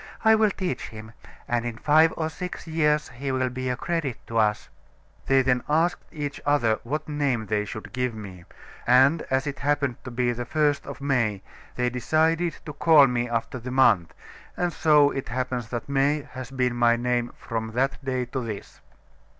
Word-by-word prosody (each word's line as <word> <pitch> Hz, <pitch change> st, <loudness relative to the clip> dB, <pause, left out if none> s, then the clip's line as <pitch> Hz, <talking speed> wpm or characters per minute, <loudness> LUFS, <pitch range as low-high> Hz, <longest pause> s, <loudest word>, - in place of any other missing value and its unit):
I 220 Hz, -, +7 dB
will 220 Hz, -1 st, +4 dB
teach 185 Hz, -2 st, -3 dB
him; 110 Hz, 0 st, -10 dB, 0.4 s
and 120 Hz, -1 st, 0 dB
in 120 Hz, -2 st, -4 dB
five 155 Hz, +6 st, +4 dB
or 160 Hz, -, -1 dB
six 180 Hz, +3 st, -6 dB
years 150 Hz, -2 st, +1 dB
he 135 Hz, +3 st, -4 dB
will 130 Hz, -1 st, 0 dB
be 130 Hz, +1 st, -4 dB
a 125 Hz, -, -1 dB
credit 160 Hz, -7 st, -2 dB
to 115 Hz, 0 st, -1 dB
us.' 105 Hz, -1 st, +1 dB, 0.6 s
They 135 Hz, 0 st, +4 dB
then 125 Hz, -1 st, +1 dB
asked 165 Hz, +4 st, +1 dB
each 145 Hz, -2 st, -5 dB
other 120 Hz, -7 st, +2 dB
what 145 Hz, +6 st, -3 dB
name 140 Hz, -7 st, -1 dB
they 105 Hz, 0 st, -1 dB
should 110 Hz, +5 st, -8 dB
give 125 Hz, -2 st, -1 dB
me, 95 Hz, -5 st, -9 dB, 0.4 s
and 135 Hz, +6 st, +5 dB
as 130 Hz, 0 st, +1 dB
it 140 Hz, -2 st, -4 dB
happened 140 Hz, -3 st, -1 dB
to 125 Hz, -, -7 dB
be 120 Hz, 0 st, 0 dB
the 120 Hz, 0 st, -4 dB
first 150 Hz, +2 st, 0 dB
day -, -, -8 dB
of 140 Hz, -, -8 dB
May, 115 Hz, -8 st, 0 dB, 0.3 s
they 125 Hz, 0 st, 0 dB
decided 160 Hz, +7 st, +1 dB
to 150 Hz, -, -6 dB
call 150 Hz, -1 st, +6 dB
me 120 Hz, -1 st, -1 dB
after 115 Hz, +2 st, -2 dB
the 125 Hz, +2 st, -7 dB
month, 100 Hz, -11 st, +3 dB, 0.5 s
and 175 Hz, -1 st, 0 dB
so 150 Hz, -3 st, +4 dB
it 135 Hz, -, -5 dB
happens 125 Hz, -2 st, -3 dB
that 120 Hz, -1 st, -4 dB
May 140 Hz, +1 st, +1 dB
has 130 Hz, -1 st, -7 dB
been 125 Hz, -2 st, 0 dB
my 120 Hz, -1 st, +4 dB
name 120 Hz, 0 st, -1 dB
from 110 Hz, -1 st, -4 dB
that 135 Hz, +3 st, -1 dB
day 130 Hz, -1 st, -1 dB
to 130 Hz, +2 st, -4 dB
this." 110 Hz, -3 st, -7 dB
130 Hz, 190 wpm, -25 LUFS, 120-150 Hz, 0.6 s, I